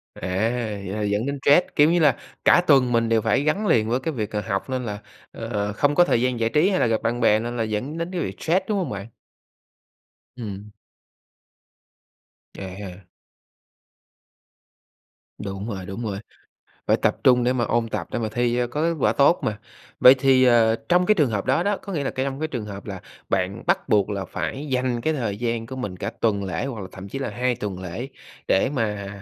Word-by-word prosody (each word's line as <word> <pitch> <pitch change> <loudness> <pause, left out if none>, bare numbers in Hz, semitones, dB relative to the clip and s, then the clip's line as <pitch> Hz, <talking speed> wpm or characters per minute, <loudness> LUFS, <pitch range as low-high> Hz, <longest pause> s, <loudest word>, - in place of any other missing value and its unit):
À, - - -12 0.7
vậy 95 +3 -4
là 105 - -2
dẫn 105 +4 0
đến 140 0 -2
stress, 145 +5 +5
kiểu 150 +2 +6
như 175 - +3
là, 145 -6 +4 0.3
cả - - +6
tuần 130 -4 +4
mình 115 -1 +2
đều 115 -1 +3
phải 110 +5 +2
gắn 175 +8 0
liền 110 - +3
với 125 +2 0
cái 160 +4 -3
việc, 110 -3 -3
ờ, 105 - -1
học 95 +6 -3
nên 130 -1 -2
là, 105 -2 -4 0.3
ờ, 105 -3 -3
không 145 +7 +1
có 175 +3 +6
thời 120 - +2
gian 125 -2 0
giải 115 - +1
trí 155 +8 +3
hay 185 - +1
là - - +3
gặp 115 -1 0
bạn 120 +1 -1
bè 110 -2 +4
nên 120 +2 -4
là 115 - 0
dẫn 110 +9 -3
đến 170 +2 -3
cái 175 - -2
việc - - -4
stress, 185 +4 +1
đúng 205 -2 0
hông 175 -8 -2
bạn? 100 0 -5 1.3
Ừm. 105 -3 -7 1.9
À 95 - -5
ha. 95 -2 -9 2.3
Đúng 100 +2 -5
rồi, 95 -4 -5
đúng 100 +5 -6
rồi, 100 -2 -3 0.7
phải - - +4
tập - - +1
trung 125 -1 +5
để 125 - +3
mà 125 -2 0
ôn 115 0 0
tập - - -3
để - - -2
mà 110 - -2
thi 120 0 +1
cho 125 0 +1
có 145 +5 -4
kết 170 0 +1
quả - - +3
tốt 145 +5 +4
mà. 105 -1 -2 0.4
Vậy 125 - +9
thì, 130 -1 +4
ờ, 115 -2 +4
trong 180 0 +3
cái 215 - +5
trường 150 - +2
hợp 105 -3 -2
đó 135 +6 +2
đó, 200 +1 +1
có 200 - -7
nghĩa 145 -5 -2
là - - -1
cái 130 +1 -2
trong 135 0 -4
cái 155 - -1
trường 120 -7 -4
hợp 100 -1 -8
là 95 -3 -6 0.3
bạn 95 +3 -1
bắt 190 +2 +1
buộc 105 0 +3
là 100 -2 -3
phải 140 +10 -4
dành 125 -2 0
cái 160 +6 0
thời 115 -8 -2
gian 115 0 -2
của 130 +2 -7
mình 105 -8 -5
cả - - -4
tuần 100 -3 +1
lễ 85 -3 -3
hoặc 120 -6 -5
là 95 - -6
thậm 95 +1 -9
chí 135 - -5
là 135 - -3
2 125 +3 0
tuần 105 -5 -5
lễ 95 +9 -5 0.4
để 95 - +3
mà, 105 -5 -2
120 Hz, 225 wpm, -23 LUFS, 105-135 Hz, 2.3 s, Vậy